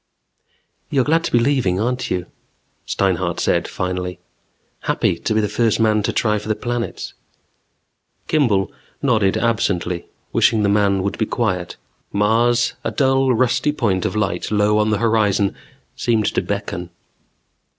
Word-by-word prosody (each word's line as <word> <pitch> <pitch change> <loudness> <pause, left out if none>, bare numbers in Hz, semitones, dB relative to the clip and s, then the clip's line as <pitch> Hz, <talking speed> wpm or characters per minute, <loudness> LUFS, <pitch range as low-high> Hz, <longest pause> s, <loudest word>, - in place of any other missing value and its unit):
"You're 135 -2 +2
glad 165 +4 +2
to - - -2
be - - +4
leaving, 120 -7 +1
aren't 125 +4 -1
you 90 -1 -1 0.3
" - - -45
Steinhart 95 -3 0
said - - +1
finally. 90 -1 -3 0.6
"Happy - - 0
to 110 - -1
be 110 - +3
the 105 - 0
first 110 +1 +1
man 110 -1 +3
to 105 - -1
try 105 -2 +1
for 105 - -10
the 110 - +1
planets 120 0 -4 0.6
" - - -48
Kimball 105 - +2 0.3
nodded 110 -8 +2
absently, 90 -6 0 0.3
wishing 110 -2 +3
the 100 - +2
man 100 -2 +2
would 100 - -3
be 110 - +1
quiet. 95 -7 -2 0.3
Mars, 115 +4 +2
a - - 0
dull 135 -2 +2
rusty 130 +5 +2
point 100 -10 0
of - - -2
light 100 -4 -1
low 105 0 +2
on 105 0 +2
the 105 - +2
horizon, 105 -3 +2 0.4
seemed 115 -3 +1
to - - +1
beckon. 100 -3 -4
105 Hz, 155 wpm, -20 LUFS, 100-120 Hz, 0.6 s, be